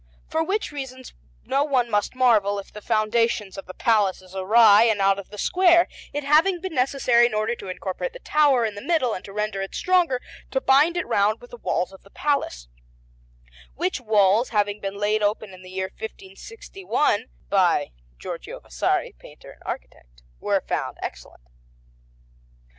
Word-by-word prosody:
For 320 Hz, -, 0 dB
which 395 Hz, +3 st, -2 dB
reasons 260 Hz, -3 st, -8 dB, 0.3 s
no 275 Hz, +1 st, +1 dB
one 260 Hz, -5 st, +1 dB
must 210 Hz, +1 st, -1 dB
marvel 215 Hz, -6 st, +3 dB
if 200 Hz, -, -8 dB
the 210 Hz, -, -9 dB
foundation 220 Hz, -1 st, 0 dB
of 195 Hz, -, -9 dB
the 185 Hz, -, -8 dB
Palace 205 Hz, -5 st, +1 dB
is 185 Hz, +1 st, -15 dB
awry 210 Hz, +2 st, +6 dB
and 220 Hz, -3 st, +2 dB
out 195 Hz, 0 st, +3 dB
of 200 Hz, -, -10 dB
the 210 Hz, -, -11 dB
square, 350 Hz, -, +4 dB, 0.2 s
it 290 Hz, 0 st, -3 dB
having 320 Hz, +6 st, +3 dB
been 375 Hz, 0 st, -6 dB
necessary, 250 Hz, -3 st, +3 dB
in 215 Hz, -, -5 dB
order 215 Hz, +2 st, 0 dB
to 195 Hz, -, -8 dB
incorporate 190 Hz, -, -4 dB
the -, -, -8 dB
tower 290 Hz, -, +3 dB
in 215 Hz, -, -2 dB
the 205 Hz, -, -8 dB
middle 285 Hz, -8 st, +1 dB
and 185 Hz, -, -6 dB
to 200 Hz, -, -10 dB
render 210 Hz, -1 st, -2 dB
it 195 Hz, -, -6 dB
stronger, 355 Hz, -8 st, +2 dB, 0.3 s
to -, -, 0 dB
bind 310 Hz, -, +4 dB
it 355 Hz, -, -1 dB
round 205 Hz, +2 st, +1 dB
with 245 Hz, -, -15 dB
the 240 Hz, -, -9 dB
walls 180 Hz, -4 st, -2 dB
of 190 Hz, -, -14 dB
the 195 Hz, -, -20 dB
Palace; 240 Hz, -, -2 dB, 1.1 s
which 345 Hz, -2 st, -2 dB
walls, 215 Hz, +1 st, +3 dB
having 205 Hz, -1 st, 0 dB
been 195 Hz, 0 st, -4 dB
laid 210 Hz, +1 st, 0 dB
open 205 Hz, -1 st, -1 dB
in 185 Hz, -, -13 dB
the 185 Hz, -, -12 dB
year 190 Hz, 0 st, -4 dB
1561 230 Hz, -, -3 dB, 0.2 s
by 175 Hz, -7 st, +2 dB, 0.3 s
Giorgio -, -, -7 dB
Vasari, -, -, -1 dB
painter -, -, -14 dB
and -, -, -19 dB
architect, -, -, -8 dB, 0.2 s
were -, -, 0 dB
found -, -, -3 dB
excellent. -, -, -8 dB
220 Hz, 175 wpm, -24 LUFS, 195-275 Hz, 1.1 s, awry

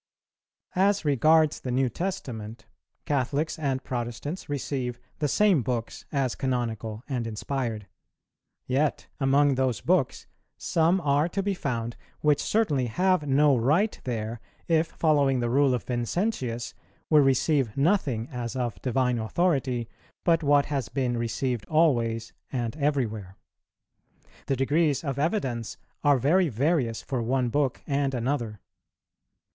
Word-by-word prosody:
_ 185 Hz, -, +2 dB
As 200 Hz, -2 st, +2 dB
regards 155 Hz, +2 st, +4 dB
the 130 Hz, -, -6 dB
New 130 Hz, +1 st, +2 dB
Testament, 120 Hz, -, -5 dB, 0.4 s
Catholics 145 Hz, +4 st, -1 dB
and 135 Hz, -3 st, -1 dB
Protestants 125 Hz, +8 st, -4 dB
receive 130 Hz, -3 st, -3 dB, 0.2 s
the 150 Hz, -, +1 dB
same 195 Hz, -1 st, +3 dB
books 115 Hz, -1 st, -4 dB
as 135 Hz, -4 st, 0 dB
canonical 115 Hz, -4 st, -3 dB
and 125 Hz, -5 st, -2 dB
inspired; 115 Hz, -1 st, -3 dB, 0.8 s
yet 140 Hz, +3 st, 0 dB
among 140 Hz, +1 st, +4 dB
those 130 Hz, -3 st, 0 dB
books -, -, +1 dB, 0.3 s
some 170 Hz, +3 st, +2 dB
are 145 Hz, +2 st, +2 dB
to 195 Hz, +3 st, -2 dB
be 200 Hz, 0 st, 0 dB
found, 120 Hz, -9 st, -3 dB, 0.2 s
which 150 Hz, -2 st, +3 dB
certainly 150 Hz, -, +1 dB
have 180 Hz, +5 st, +1 dB
no 140 Hz, +1 st, +4 dB
right 150 Hz, -, +1 dB
there 115 Hz, -2 st, -4 dB, 0.3 s
if, 165 Hz, -1 st, +3 dB
following 145 Hz, -5 st, +2 dB
the 120 Hz, -1 st, -1 dB
rule 140 Hz, +1 st, +4 dB
of 120 Hz, -, -4 dB
Vincentius, 120 Hz, -, -2 dB, 0.4 s
we 155 Hz, -, +7 dB
receive 135 Hz, -3 st, +2 dB
nothing 140 Hz, -, +1 dB
as 120 Hz, -1 st, -4 dB
of 120 Hz, -7 st, -3 dB
divine 125 Hz, -1 st, +1 dB
authority 130 Hz, -2 st, 0 dB, 0.4 s
but 165 Hz, -1 st, +3 dB
what 145 Hz, -1 st, +4 dB
has 135 Hz, -6 st, -2 dB
been 125 Hz, -3 st, -1 dB
received 120 Hz, 0 st, -2 dB
always 120 Hz, -8 st, +1 dB, 0.2 s
and 120 Hz, -2 st, -2 dB
everywhere. 110 Hz, -10 st, -1 dB, 1.1 s
The 135 Hz, -, +1 dB
degrees 145 Hz, +3 st, +1 dB
of 140 Hz, -3 st, -3 dB
evidence 135 Hz, -, -1 dB, 0.3 s
are 145 Hz, -2 st, +5 dB
very 160 Hz, +7 st, +3 dB
various 130 Hz, -2 st, 0 dB
for 130 Hz, -3 st, -2 dB
one 125 Hz, +1 st, 0 dB
book 135 Hz, 0 st, 0 dB
and 140 Hz, -2 st, 0 dB
another. 120 Hz, -4 st, -2 dB
135 Hz, 130 wpm, -27 LUFS, 120-150 Hz, 1.1 s, we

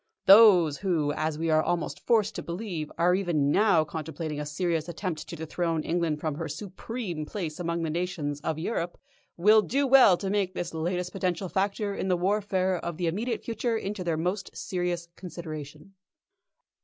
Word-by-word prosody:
Those 190 Hz, -8 st, +7 dB
who, 165 Hz, -7 st, 0 dB
as 155 Hz, 0 st, -2 dB
we 165 Hz, 0 st, 0 dB
are 155 Hz, 0 st, +4 dB
almost 170 Hz, +1 st, -2 dB
forced 220 Hz, -3 st, +3 dB
to -, -, -5 dB
believe, 170 Hz, -2 st, -5 dB
are 175 Hz, +2 st, +3 dB
even 170 Hz, -7 st, +1 dB
now 195 Hz, -5 st, +4 dB
contemplating 155 Hz, 0 st, -5 dB
a 150 Hz, -, -4 dB
serious 165 Hz, +1 st, -1 dB
attempt 170 Hz, -2 st, -4 dB
to -, -, -6 dB
dethrone 160 Hz, 0 st, -2 dB
England 165 Hz, -3 st, 0 dB
from 155 Hz, -1 st, -2 dB
her 160 Hz, +3 st, -4 dB
supreme 185 Hz, -, -5 dB
place 160 Hz, -1 st, -5 dB
among 170 Hz, -1 st, -2 dB
the 160 Hz, -, -1 dB
nations 155 Hz, -4 st, -3 dB
of 155 Hz, +1 st, -2 dB
Europe, 175 Hz, 0 st, -3 dB, 0.4 s
will 210 Hz, +5 st, +6 dB
do 275 Hz, +6 st, 0 dB
well 255 Hz, -9 st, +7 dB
to 195 Hz, 0 st, -3 dB
take 195 Hz, -2 st, 0 dB
this 175 Hz, -1 st, -4 dB
latest 180 Hz, +2 st, -2 dB
potential 185 Hz, -1 st, -2 dB
factor 200 Hz, +2 st, -1 dB
in 190 Hz, -, -3 dB
the 180 Hz, -1 st, +2 dB
warfare 190 Hz, -1 st, +1 dB
of 170 Hz, -1 st, -5 dB
the 180 Hz, -, -1 dB
immediate 215 Hz, +9 st, -2 dB
future 230 Hz, 0 st, -1 dB
into 200 Hz, -2 st, -4 dB
their 165 Hz, -2 st, -1 dB
most 180 Hz, +5 st, -2 dB
serious 175 Hz, -2 st, -2 dB
consideration." 155 Hz, -1 st, -8 dB
175 Hz, 175 wpm, -27 LUFS, 160-195 Hz, 0.4 s, Those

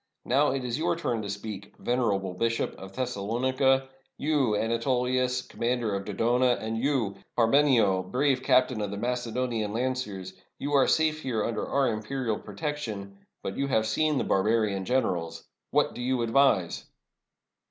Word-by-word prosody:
Now 140 Hz, +4 st, +3 dB
it 130 Hz, -1 st, -2 dB
is 125 Hz, +3 st, -2 dB
your 170 Hz, +1 st, +1 dB
turn 120 Hz, -9 st, -2 dB
to 100 Hz, -, -5 dB
speak, 100 Hz, 0 st, -6 dB
venerable 100 Hz, -7 st, 0 dB
Bishop 115 Hz, +5 st, -1 dB
of 95 Hz, 0 st, -9 dB
Thes 125 Hz, +3 st, -2 dB
salonica; 130 Hz, +6 st, +1 dB, 0.3 s
you, 140 Hz, -7 st, +1 dB
Anatolius, 125 Hz, +3 st, 0 dB
commander 120 Hz, -3 st, -1 dB
of 100 Hz, 0 st, -3 dB
Dodona; 120 Hz, +4 st, +2 dB
and 110 Hz, +1 st, -3 dB
you, 115 Hz, -5 st, 0 dB, 0.2 s
Parmenio, 115 Hz, -6 st, +4 dB
brave 130 Hz, +7 st, +1 dB
captain 125 Hz, -3 st, +3 dB
of 105 Hz, -, -2 dB
the 100 Hz, -, -5 dB
Macedonian 120 Hz, -2 st, -2 dB
lanc 130 Hz, +2 st, 0 dB
ers. 95 Hz, -2 st, -7 dB, 0.2 s
You 145 Hz, -, -3 dB
are 140 Hz, -2 st, +5 dB
safe 155 Hz, -1 st, +2 dB
here 115 Hz, -6 st, -1 dB
under 115 Hz, -2 st, -2 dB
our 140 Hz, -1 st, +2 dB
imperial 110 Hz, +1 st, -2 dB
protection, 105 Hz, -4 st, -5 dB, 0.2 s
but 95 Hz, -, -4 dB
you 140 Hz, -, 0 dB
have 110 Hz, -5 st, +2 dB
seen 150 Hz, +6 st, +1 dB
the -, -, +1 dB
barbarian 100 Hz, -1 st, +1 dB
generals. 90 Hz, -10 st, -1 dB, 0.2 s
What -, -, +2 dB
do -, -, -7 dB
you 125 Hz, -1 st, 0 dB
advise?" 115 Hz, -7 st, +2 dB
120 Hz, 155 wpm, -28 LUFS, 105-130 Hz, 0.3 s, are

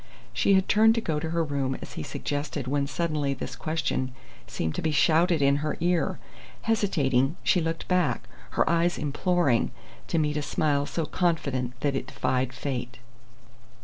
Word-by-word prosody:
She 200 Hz, -, +3 dB
had 190 Hz, 0 st, +3 dB
turned 220 Hz, +2 st, +5 dB
to -, -, +2 dB
go 160 Hz, -8 st, -1 dB
to 160 Hz, -, -3 dB
her 165 Hz, 0 st, +1 dB
room 140 Hz, -3 st, -1 dB
as -, -, -9 dB
he -, -, -5 dB
suggested 145 Hz, -1 st, -3 dB
when 140 Hz, +1 st, 0 dB
suddenly 150 Hz, -4 st, -1 dB
this 125 Hz, -1 st, -6 dB
question 155 Hz, -5 st, -2 dB, 0.3 s
seemed 80 Hz, -1 st, -2 dB
to -, -, -3 dB
be 160 Hz, -, 0 dB
shouted 160 Hz, +2 st, +3 dB
in 140 Hz, 0 st, +4 dB
her 150 Hz, +1 st, -2 dB
ear. 175 Hz, 0 st, +1 dB, 0.5 s
Hesitating, 150 Hz, -, +2 dB
she 180 Hz, -, +3 dB
looked 165 Hz, 0 st, -3 dB
back, 180 Hz, -9 st, +1 dB, 0.3 s
her -, -, +3 dB
eyes 170 Hz, +1 st, +2 dB
imploring, 150 Hz, -3 st, +1 dB, 0.4 s
to -, -, 0 dB
meet 150 Hz, -1 st, +1 dB
a -, -, 0 dB
smile 145 Hz, -1 st, 0 dB
so 165 Hz, -, -2 dB
confident 135 Hz, -9 st, -1 dB
that 140 Hz, -2 st, +1 dB
it -, -, -3 dB
defied 130 Hz, 0 st, -1 dB
fate. 125 Hz, -2 st, -4 dB
150 Hz, 170 wpm, -27 LUFS, 135-170 Hz, 0.5 s, turned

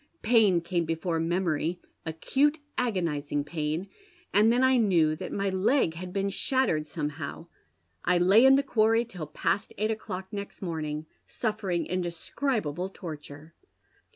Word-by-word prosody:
Pain 215 Hz, -6 st, +4 dB
came 170 Hz, 0 st, -1 dB
befor 165 Hz, +1 st, -1 dB
memory, 170 Hz, 0 st, 0 dB, 0.3 s
acute, 275 Hz, -, +1 dB, 0.2 s
agonizing 165 Hz, -11 st, -1 dB
pain, 155 Hz, +3 st, -3 dB, 0.5 s
and 215 Hz, +2 st, +5 dB
then 245 Hz, +2 st, +3 dB
I 260 Hz, 0 st, +5 dB
knew 170 Hz, -9 st, +3 dB
that -, -, -6 dB
my 200 Hz, 0 st, -1 dB
leg 190 Hz, -, +2 dB
hav.. 180 Hz, +2 st, -7 dB
been 195 Hz, +1 st, 0 dB
shattered 200 Hz, -, +1 dB
somehow. 150 Hz, +1 st, -5 dB, 0.6 s
I 180 Hz, 0 st, +3 dB
lay 190 Hz, +6 st, +6 dB
in 265 Hz, 0 st, +8 dB
the 280 Hz, -, +3 dB
quarry 225 Hz, -2 st, +3 dB
till 180 Hz, -9 st, -7 dB
past 155 Hz, +6 st, -1 dB
eight 215 Hz, +2 st, +1 dB
o'clock 190 Hz, -4 st, -5 dB
next 200 Hz, 0 st, -6 dB
morning, 155 Hz, -4 st, -3 dB, 0.2 s
suffering 210 Hz, -6 st, -2 dB
indescribable 180 Hz, -, -2 dB
torture. 155 Hz, -3 st, -9 dB
180 Hz, 135 wpm, -28 LUFS, 160-215 Hz, 0.6 s, in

